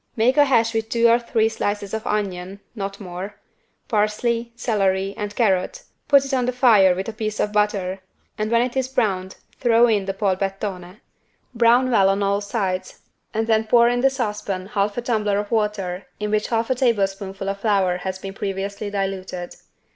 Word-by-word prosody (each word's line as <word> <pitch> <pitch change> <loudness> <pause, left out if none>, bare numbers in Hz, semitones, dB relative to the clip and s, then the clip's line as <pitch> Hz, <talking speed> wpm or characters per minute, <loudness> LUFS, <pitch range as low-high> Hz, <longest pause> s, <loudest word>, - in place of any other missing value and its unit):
Make 240 +3 +3
a 290 -1 +6
hash 230 -4 +2
with 225 0 -2
two 235 0 +3
or 235 +1 +5
three 225 -2 +1
slices 205 -2 -3
of 220 0 -3
onion 195 -2 -3
(not 200 -3 -5
more) 190 +1 -7 0.5
parsley, 230 +2 0
celery, 195 -5 0
and 205 0 -5
carrot, 225 - +1 0.2
put 280 -1 +5
it 275 - -5
on 250 -2 +1
the - - +2
fire 220 -8 +5
with 190 +2 -4
a 225 - -4
piece 215 0 -4
of 210 - 0
butter 200 -3 0 0.4
and 215 -1 -2
when 235 +1 +3
it 250 0 -4
is 260 -1 0
browned 200 -8 -1 0.2
throw 235 -1 +5
in 210 -4 +1
the 195 - -2
=Polpettone=. 195 -1 -3 0.5
Brown 240 +2 +4
well 195 -4 +4
on 195 +1 +1
all 200 +1 +1
sides 195 -3 -3 0.3
and 220 +1 -1
then 220 -1 +2
pour 235 +1 +5
in 245 0 0
the 270 - +5
saucepan 210 -7 -3
half 205 -1 -1
a 240 - -2
tumbler 215 -4 0
of 205 0 -3
water 205 -4 -1
in 210 0 -2
which 215 0 +1
half 230 +1 0
a - - +5
tablespoonful 195 -6 -1
of 195 0 -3
flour 195 -4 +1
has 190 +1 -4
been 195 0 -7
previously 200 +1 -4
diluted. 190 -3 -4
210 Hz, 185 wpm, -22 LUFS, 195-230 Hz, 0.5 s, a